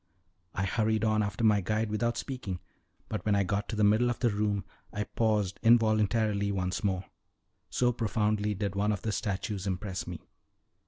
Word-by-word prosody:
I 95 - 0
hurried 110 +2 +1
on 110 -1 +3
after 100 +2 -2
my 105 -2 +5
guide 110 +3 -1
without 120 +2 0
speaking, 115 -10 -4 0.5
but 105 - -4
when 105 -1 +2
I 100 - +3
got 100 +2 -2
to 115 - -2
the 105 - +1
middle 110 +4 +4
of 120 - -1
the 120 -3 +2
room 105 -1 0 0.3
I 105 - -2
paused 105 -4 0
involuntarily 110 -2 +3
once 90 -1 -2
more, 95 -2 0 0.6
so 125 -1 +2
profoundly 105 -2 0
did 100 0 -2
one 105 +2 +2
of 105 - -3
the 110 - 0
statues 100 0 -2
impress 95 0 -3
me. - - -7
105 Hz, 175 wpm, -30 LUFS, 100-110 Hz, 0.6 s, my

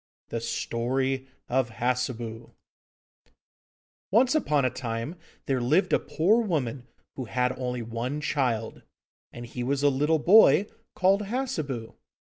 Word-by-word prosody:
THE 115 - -3
STORY 130 +3 -1 0.2
OF 130 -1 +1
HASSEBU 120 -2 -3 1.5
Once 245 +7 +4
upon 150 - +2
a 130 - +1
time 115 +4 -4 0.3
there 130 -2 0
lived 125 +11 +2
a - - +5
poor 200 +10 +2
woman 140 - -2 0.3
who 130 - -4
had 125 +2 0
only 125 -2 -3
one 115 +5 -3
child, 125 -7 -1 0.5
and 120 0 -8
he 120 +1 -6
was 135 +3 -1
a 145 - +6
little 150 +4 +2
boy 200 +4 +6 0.3
called 195 +3 +3
Hassebu. 155 - -3
130 Hz, 130 wpm, -27 LUFS, 120-155 Hz, 1.5 s, a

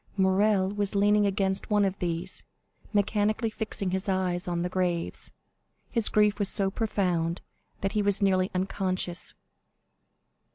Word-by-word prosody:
Morrel 190 0 +3
was 205 -1 -1
leaning 205 +1 +4
against 195 -1 -1
one 210 -1 +3
of 195 0 -2
these, 170 -1 -3 0.5
mechanically 210 +2 +1
fixing 210 -4 -3
his 190 +1 -1
eyes 185 -2 0
on 175 -1 -1
the - - 0
graves. 180 -2 -2 0.6
His 230 -4 +3
grief 210 0 +3
was 205 -1 +3
so 195 -1 +1
profound 180 -6 0 0.4
that 195 - 0
he 210 - +1
was 200 -1 +2
nearly 190 -1 +2
unconscious. 185 -1 -2
195 Hz, 135 wpm, -28 LUFS, 185-205 Hz, 0.6 s, leaning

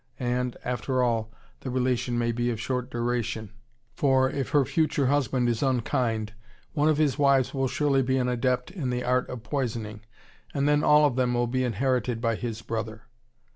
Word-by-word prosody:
And, 125 0 -1
after 125 +1 0
all, 115 -2 0 0.3
the 130 - -6
relation 125 -1 0
may 120 0 +1
be 120 +1 -1
of 115 -2 -3
short 125 +1 -2
duration, 115 -3 -2 0.4
for, 130 -1 +2
if 135 -3 -3
her 145 -2 +3
future 155 -2 +1
husband 130 -2 +1
is 115 -2 0
unkind, 115 -4 0 0.4
one 150 0 +2
of 155 - +2
his 150 -2 +1
wives 140 -3 +3
will 135 -1 0
surely 140 0 +1
be 130 +1 +1
an 125 -1 +1
adept 125 +3 0
in 160 -10 -3
the 125 0 -1
art 125 0 +1
of 125 -3 -7
poisoning, 115 -7 -3 0.5
and 140 0 +1
then 150 0 +3
all 150 0 +6
of 135 -4 +1
them 125 -1 +1
will 120 0 +2
be 130 +2 -1
inherited 125 0 0
by 115 -1 +1
his 115 -1 -5
brother. 110 -1 -4
125 Hz, 185 wpm, -26 LUFS, 120-135 Hz, 0.5 s, all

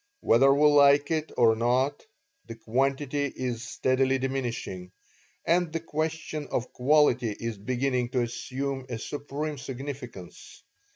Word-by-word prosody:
Whether 135 +4 +5
we 145 +2 +4
like 145 0 +5
it 155 -1 -1
or 115 -2 +5
not, 125 +5 0 0.4
the 115 - -7
quantity 135 +5 -1
is 125 -4 -4
steadily 130 +2 +1
diminishing, 120 -9 -4 0.5
and 175 -1 +2
the 165 - -2
question 155 -1 -3
of 125 +1 -3
quality 125 -4 +3
is 115 -3 -4
beginning 125 +2 -1
to 125 -1 0
assume 130 +2 -4
a 120 - -3
supreme 145 +4 -5
significance. 130 -7 -8
135 Hz, 125 wpm, -27 LUFS, 120-145 Hz, 0.5 s, Whether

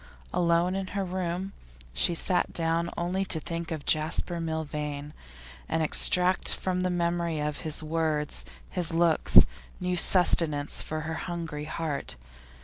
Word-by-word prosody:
Alone 175 +1 +2
in 195 -1 -3
her 195 - 0
room 185 +1 -3 0.4
she 170 - +2
sat 180 +2 0
down 165 0 0
only 180 +3 -1
to 165 - +3
think 170 +1 -5
of 155 -3 -5
Jasper 160 +2 0
Milvain, 150 -2 -4 0.6
and 160 0 0
extract 180 +4 +4
from 185 -1 -2
the 185 - 0
memory 170 -2 -1
of 150 0 -2
his 155 -1 -1
words, 155 -1 -1 0.3
his 175 -3 0
looks, 165 -2 +6 0.3
new 180 0 -1
sustenance 165 -5 +3
for 155 0 -4
her 160 +1 -4 0.2
hungry 165 -4 -5
heart. 155 - -3
165 Hz, 140 wpm, -27 LUFS, 155-180 Hz, 0.6 s, looks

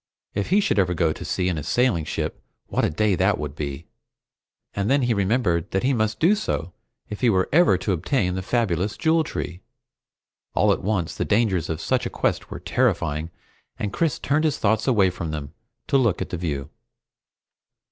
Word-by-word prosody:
If 100 0 -2
he 200 +4 +4
should 150 - +1
ever 90 -2 +2
go 80 -1 +2
to - - -8
sea 90 -1 -1
in 85 -4 0
a - - -6
sailing 120 - +1
ship, - - -3 0.2
what - - -1
a - - +3
day 105 +6 +1
that 95 +2 +2
would 75 -2 -5
be! 70 0 -5 0.9
And 100 +2 -1
then 140 0 +3
he 120 -1 +2
remembered 100 -5 +1
that 95 - -1
he 135 +2 +2
must 110 -2 0
do 170 +6 +5
so 90 - -2 0.4
if 105 - -6
he 125 - +4
were 95 -3 +2
ever 175 +3 +5
to 105 - -2
obtain 90 - 0
the 95 - -2
fabulous 100 -2 0
Jewel 160 0 +3
Tree. 90 - -5 0.9
All - - +4
at - - -4
once 95 -4 -1
the - - -2
dangers 105 -6 +1
of 80 - -2
such - - 0
a - - -5
quest - - -1
were - - -6
terrifying, 75 +3 0 0.5
and 105 -2 -3
Chris 160 -6 +1
turned 150 +2 0
his 150 - +1
thoughts 110 +3 +1
away 100 -8 +4
from 85 -2 -5
them 75 -1 -5 0.3
to 135 - +3
look 115 -8 +2
at - - -4
the 90 - -2
view. 75 -5 -3
100 Hz, 200 wpm, -24 LUFS, 85-120 Hz, 0.9 s, do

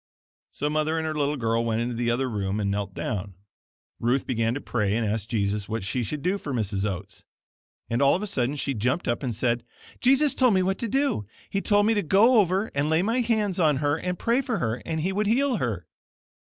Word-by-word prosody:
So 145 - -2
Mother 155 +1 0
and 160 - -1
her 155 - -1
little 150 -1 0
girl 115 -1 0
went 115 -1 0
into 120 +1 -1
the 120 0 -1
other 125 +3 +1
room 100 -3 -2
and 100 -1 0
knelt 100 -1 -3
down. 100 -2 -4 0.6
Ruth 125 +3 +1
began 115 -1 0
to - - -2
pray 105 -7 -1
and 115 - 0
ask 105 0 -2
Jesus 100 -2 -1
what 110 -2 -2
she 100 +7 -1
should 145 +5 -4
do 190 +3 0
for 145 - -6
Mrs. 105 -2 0
Oats. 95 +2 -7 0.6
And 115 +3 -1
all 140 0 +5
of 190 - -3
a - - -1
sudden 135 -7 -1
she 140 -1 -1
jumped 125 +8 -1
up 120 - 0
and 125 -5 -3
said, 120 +1 0 0.4
"Jesus 270 +2 +4
told 250 -6 +3
me 185 - +3
what 190 +1 -1
to 235 - -2
do. 270 - 0 0.2
He 200 - 0
told 205 0 +3
me 225 - +3
to 205 - +1
go 215 +8 +5
over 195 +2 +1
and 140 +2 0
lay 160 +3 +3
my 230 +5 +1
hands 215 -5 0
on 155 -5 +3
her 145 +1 +1
and 180 +2 -3
pray 235 +3 +1
for 250 -5 -2
her, 115 - -2
and 160 -1 -1
he 190 +4 -1
would 210 +1 0
heal 255 +2 +2
her." 105 - -2
140 Hz, 235 wpm, -26 LUFS, -, 0.6 s, all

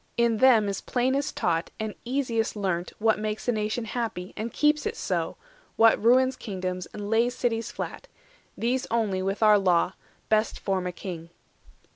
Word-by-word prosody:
360 235 - +4
In - - -1
them 235 -5 +6
is 200 - -3
plainest 260 +3 0
taught, 165 -1 0
and 220 -1 -3
easiest 240 -4 -1
learnt, 185 -4 -2
What 220 0 +2
makes 215 +2 -3
a - - +4
nation 215 +1 -2
happy, 220 -5 -4
and 225 +2 -4
keeps 300 0 +2
it - - -4
so, - - -2 0.4
What 225 -1 +5
ruins 255 +2 +4
kingdoms, 185 -5 -4
and 205 -1 -7
lays 230 +3 +2
cities 230 -2 -1
flat; - - -6 0.5
These 250 +3 0
only, 215 -5 0
with 195 +3 -1
our 210 -1 +7
Law, 180 -1 +2 0.3
best 215 0 +1
form 190 -2 -1
a - - -2
king." 170 -3 -7
220 Hz, 170 wpm, -26 LUFS, 195-240 Hz, 0.5 s, our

